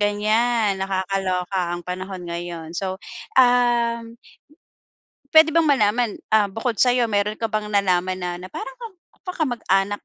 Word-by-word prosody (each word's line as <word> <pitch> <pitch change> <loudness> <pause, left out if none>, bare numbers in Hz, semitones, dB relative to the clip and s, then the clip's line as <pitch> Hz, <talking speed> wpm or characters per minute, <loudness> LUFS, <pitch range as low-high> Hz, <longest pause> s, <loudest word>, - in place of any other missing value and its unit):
ganiyan, 210 0 +1
nakakaloka 190 -1 -2 0.2
ang 175 - -10
panahon 185 0 -6
ngayon. 170 -1 -6
So, 185 +2 -3 0.4
um, 240 -2 +3 1.2
puwede 315 0 +8
bang 330 -1 +4
malaman, 235 -5 +1
ah, 210 -2 +3
bukod 225 +1 -2
sa'yo, 245 0 +3
meron 210 0 -1
ka 225 - -1
bang 215 -1 -2
nalaman 185 -2 +1
na 175 -1 -3
na 185 +1 -11
parang - - -7 0.5
ka 365 - -4
kamag-anak 205 - -1
205 Hz, 130 wpm, -22 LUFS, 185-235 Hz, 1.2 s, puwede